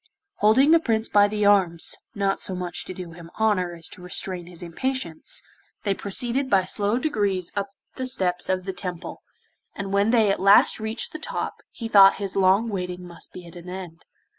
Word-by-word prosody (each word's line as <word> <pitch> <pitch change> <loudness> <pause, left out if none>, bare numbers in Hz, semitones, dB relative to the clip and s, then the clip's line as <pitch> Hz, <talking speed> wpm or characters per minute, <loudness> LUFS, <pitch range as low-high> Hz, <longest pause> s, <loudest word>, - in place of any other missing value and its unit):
Holding 245 +8 +5
the 330 - +7
Prince 225 -7 0
by 205 0 +5
the 210 0 -1
arms, 185 -5 +3 0.2
not 195 -1 0
so 190 - -3
much 180 -1 -2
to - - -6
do 180 -2 -8
him 165 0 -12
honour 185 -5 +1
as 165 -1 -7
to - - -11
restrain 180 0 -4
his 175 -1 -8
impatience, 175 -1 -3 0.4
they 200 - +1
proceeded 240 +7 -1
by 190 -2 +3
slow 205 +4 -1
degrees 205 - -1
up 200 -1 -2 0.3
the 260 -1 -3
steps 180 -8 -1
of 185 -1 0
the 190 - -3
Temple, 180 -2 -6 0.5
and 195 -1 -5
when 200 +2 +3
they 225 -4 +4
at - - -1
last 195 +3 +5
reached 220 +1 -3
the 310 - -6
top - - -3 0.2
he 230 - -6
thought 195 -3 +7
his 195 -2 -5
long 195 +3 +3
waiting 180 -3 -4
must 170 -1 -9
be 180 - -10
at 170 - -13
an 175 +1 -10
end. 180 -3 -9
195 Hz, 195 wpm, -24 LUFS, 180-215 Hz, 0.5 s, the